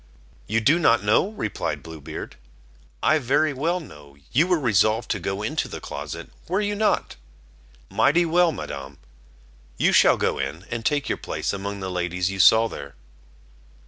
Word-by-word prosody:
"You 110 - +1
do 145 +10 +4
not 120 -10 +3
know," 110 - +3
replied 215 - -4
Blue 80 -2 -10
Beard; - - -7 0.7
"I 155 - +4
very 145 +3 +1
well 165 +7 -1
know, 75 - -14
you 160 +8 +3
were 180 -3 +2
resolved 110 -2 +2
to 100 - -1
go 95 +3 -3
into 110 - -1
the - - -7
closet, - - -7 0.2
were 185 +4 0
you 205 0 -1
not? 210 +1 0 0.7
Mighty 170 +4 +3
well, 170 +1 +3
Madam; 70 - -7 0.8
you - - +3
shall - - +6
go - - 0
in, 85 +6 -4
and 115 -1 -3
take 145 +4 0
your - - -2
place - - -3
among 100 0 -5
the 95 -1 -4
ladies 90 +1 -1
you 95 - -6
saw 110 +5 +6
there." 70 -9 -9
115 Hz, 170 wpm, -24 LUFS, 95-160 Hz, 0.8 s, shall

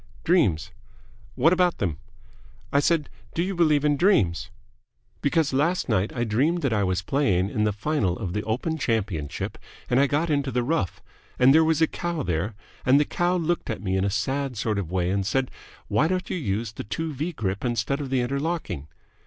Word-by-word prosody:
"Dreams." 150 - +2 0.6
"What 160 +7 +4
about 180 -1 +2
them?" 85 -7 -2 0.7
"I 140 - +5
said, 150 0 +2 0.3
'Do 170 - +1
you 195 +2 -2
believe 155 -5 +3
in 145 -1 +3
dreams?' 95 - +2 0.7
Because 145 0 +1
last 165 +7 +1
night 105 -2 +1
I 120 - -2
dreamed 140 +10 +1
that 135 -5 +1
I 105 -2 +2
was 90 -1 0
playing 100 -6 +1
in 105 - +1
the 105 - +2
final 105 - -1
of 95 -6 -4
the 105 - -1
Open 130 +10 -2
Championship, 100 - -2 0.3
and 125 - +4
I 140 - +5
got 155 +4 0
into 140 -2 +1
the 125 -1 0
rough, 120 - -1 0.3
and 130 +2 +6
there 160 +1 +6
was 160 0 +2
a - - +5
cow 170 -4 -3
there, 90 +4 -2 0.3
and 130 +3 +5
the 150 - +3
cow 175 +4 0
looked 175 0 -1
at 110 -3 -4
me 95 -1 0
in 95 - +1
a 100 - +1
sad 130 +6 -2
sort 105 -1 0
of 90 -5 -4
way 90 0 0
and 100 0 0
said, 130 +6 0 0.4
'Why 155 - +2
don't 185 +1 -2
you - - -1
use 110 - -2
the - - -7
two 160 +9 -3
V 155 +6 -3
grip 100 - -3
instead 120 +4 -1
of 140 - -4
the 130 -1 +1
interlocking?' 140 - -2
130 Hz, 200 wpm, -25 LUFS, 100-155 Hz, 0.7 s, and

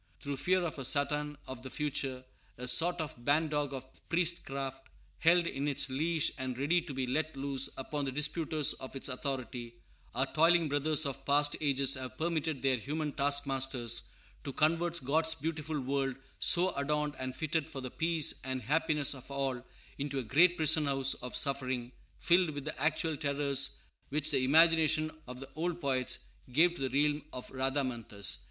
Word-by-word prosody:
Through 140 -2 -4
fear 185 +5 +2
of 160 -4 -4
a - - -4
Satan 150 +2 0
of 130 -1 -8
the 130 - -8
future, 135 -3 -2 0.3
a 125 +1 -5
sort 170 +8 +5
of 145 -6 -5
ban 150 +4 +2
dog 145 -2 -1
of 130 -1 -6 0.2
priestcraft, 140 -6 -2 0.3
held 170 +1 +4
in 140 -3 -2
its 140 -1 +1
leash 160 +3 +1
and 130 -1 -3
ready 155 +6 +2
to 165 -3 -8
be 130 -1 -1
let 155 +3 -2
loose 135 -1 +1
upon 145 +2 -3
the 135 - -2
disputers 150 +1 +1
of 130 - -9
its 135 - -1
authority, 125 -3 -4 0.4
our 130 +2 +2
toiling 165 +1 +4
brothers 150 +2 +1
of 135 -1 -4
past 145 +1 +3
ages 140 -2 +3
have 130 -2 -6
permitted 160 -4 -2
their 135 -2 +3
human 150 +5 -3
taskmasters 135 -4 0 0.3
to 140 - -4
convert 165 +1 0
God's 160 +3 +2
beautiful 155 -1 -3
world, 135 0 -1 0.2
so 180 +2 +5
adorned 150 +1 -1
and 130 0 -4
fitted 155 +1 -1
for 135 - -6
the 130 -1 -6
peace 165 -2 +1
and 130 -1 -2
happiness 150 +2 +2
of 130 -1 -12
all, 135 -3 -2 0.4
into 140 0 -2
a 130 - -1
great 170 +10 +4
prison 155 -1 +4
house 135 -1 +2
of 125 - -6
suffering, 130 -3 -1 0.3
filled 175 0 +3
with 145 -2 -6
the 155 -3 -5
actual 155 +1 +1
terrors 140 -2 0 0.3
which 150 +2 0
the 135 -3 +3
imagination 155 +2 +4 0.2
of 125 0 -8
the 135 0 -9
old 175 +2 -2
poets 130 -5 0 0.3
gave 165 +7 +4
to 135 -6 -3
the 140 +4 +2
realm 150 0 0
of 125 - -7
Rhadamanthus. 125 - -1
140 Hz, 175 wpm, -32 LUFS, 130-155 Hz, 0.4 s, sort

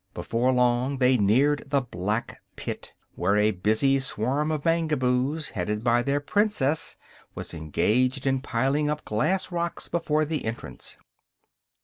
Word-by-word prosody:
Before 120 +3 0
long 125 +2 +2
they 130 0 +4
neared 130 +7 +3
the 140 -1 +2
Black 105 -1 -3
Pit, - - -6 0.2
where 100 +2 +1
a 105 +1 +4
busy 110 +8 +2
swarm 135 +4 0
of 155 -1 -3
Mangaboos, 150 -3 +1
headed 105 +2 -2
by 120 0 +3
their 140 +3 0
Princess, 160 -3 0 0.4
was - - -6
engaged 125 - 0
in 135 -1 +1
piling 135 +4 0
up 150 0 -3
glass 160 - 0
rocks 170 0 -3
before 155 -2 0
the 155 0 -3
entrance. 110 - -6
130 Hz, 135 wpm, -26 LUFS, 115-150 Hz, 0.4 s, they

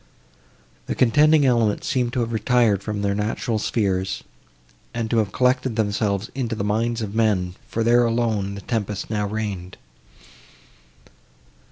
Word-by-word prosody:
The - - -2
contending 150 +4 +4
elements 115 -5 +2
seemed 125 -2 0
to 125 - 0
have 115 0 -2
retired 110 -2 +2
from 105 0 -4
their 100 0 +1
natural 110 +2 -1
spheres, 95 -4 -1 0.7
and 115 -1 -2
to 120 - +2
have 105 -3 0
collected 130 0 +1
themselves 105 -1 -1
into 120 -4 -2
the 100 - -3
minds 115 +3 0
of 100 -1 -5
men, 105 -5 +1
for 115 - -1
there 120 +1 +4
alone 110 -4 0
the 100 - -7
tempest 105 -1 -3
now 105 -1 0
reigned. 100 -4 -4
110 Hz, 145 wpm, -23 LUFS, 100-120 Hz, 0.7 s, contending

